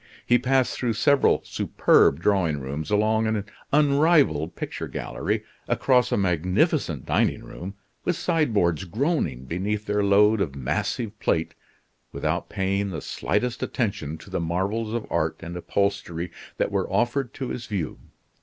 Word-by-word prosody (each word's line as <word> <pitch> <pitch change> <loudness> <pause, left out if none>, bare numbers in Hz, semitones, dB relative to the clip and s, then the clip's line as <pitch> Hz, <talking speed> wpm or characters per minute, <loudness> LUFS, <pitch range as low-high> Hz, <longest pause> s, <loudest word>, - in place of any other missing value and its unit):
He 120 0 +4
passed 130 +1 +2
through 120 -3 -1
several 140 +5 +3
superb 70 - +3
drawing 85 -7 +2
rooms, 70 +5 -5
along 110 +1 +2
an 110 -2 -1 0.3
unrivaled 145 - +3
picture - - -5
gallery, - - -3 0.2
across 125 -4 +2
a - - +2
magnificent 90 - +1
dining - - +1
room, 95 +3 -8 0.3
with 180 - 0
sideboards 110 - +1
groaning 105 - -1
beneath 100 +7 -2
their 105 -1 +1
load 105 +2 +4
of 70 -8 -2
massive 105 - -2
plate, 80 0 0 0.6
without - - -2
paying 100 +1 -1
the 80 -4 -4
slightest 125 +9 -2
attention 80 - -2
to 95 - -14
the 95 - -1
marvels 95 +7 -1
of 115 -1 -2
art - - 0
and 85 +1 -7
upholstery 90 -2 -1 0.3
that - - 0
were - - -1
offered 120 +1 +1
to 130 - -4
his 115 -2 -5
view. 90 - -3
100 Hz, 145 wpm, -25 LUFS, 85-120 Hz, 0.6 s, He